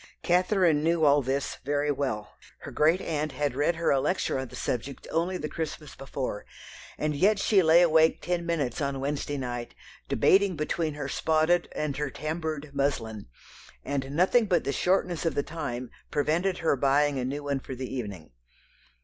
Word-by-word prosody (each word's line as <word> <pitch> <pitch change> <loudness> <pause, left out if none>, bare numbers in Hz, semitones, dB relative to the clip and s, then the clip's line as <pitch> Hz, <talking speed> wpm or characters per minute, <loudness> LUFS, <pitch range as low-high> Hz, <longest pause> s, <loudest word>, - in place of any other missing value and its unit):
Catherine 180 -3 +3
knew 165 -1 +2
all 145 0 +5
this 135 +2 -2
very 145 +2 0
well; 130 -7 -3 0.3
her - - -8
great 160 +5 +3
aunt 155 -2 -2
had 145 0 -1
read 145 +5 +1
her 165 0 +1
a 135 - +3
lecture 150 -1 0
on 130 - -4
the - - -12
subject 130 +3 -4
only 175 +3 0
the 150 - -4
Christmas 155 -2 -5
before; 135 -5 -5 0.5
and 150 -1 -1
yet 200 +8 +3
she 200 0 +4
lay 165 +1 +6
awake 160 -1 +4
ten 175 -1 -2
minutes 155 -7 -1
on 140 -1 -1
Wednesday 145 +1 -2
night 120 -2 -5 0.3
debating 195 -1 +3
between 155 0 -2
her 145 -2 -4
spotted 160 +4 +1
and 150 -3 -2
her 150 0 -1
tamboured 155 0 -4
muslin; 120 -7 -2 0.6
and 135 -2 -2
nothing 190 +8 +3
but 175 -4 +2
the 140 - -1
shortness 180 +1 +1
of 165 - 0
the 145 - +1
time 130 -6 -5 0.2
prevented 170 +6 0
her 160 -4 +1
buying 140 +1 +2
a - - -1
new 140 +3 -3
one 140 -1 -1
for 130 - -7
the 130 +1 -5
evening. 100 -10 -6
150 Hz, 175 wpm, -27 LUFS, 135-165 Hz, 0.6 s, lay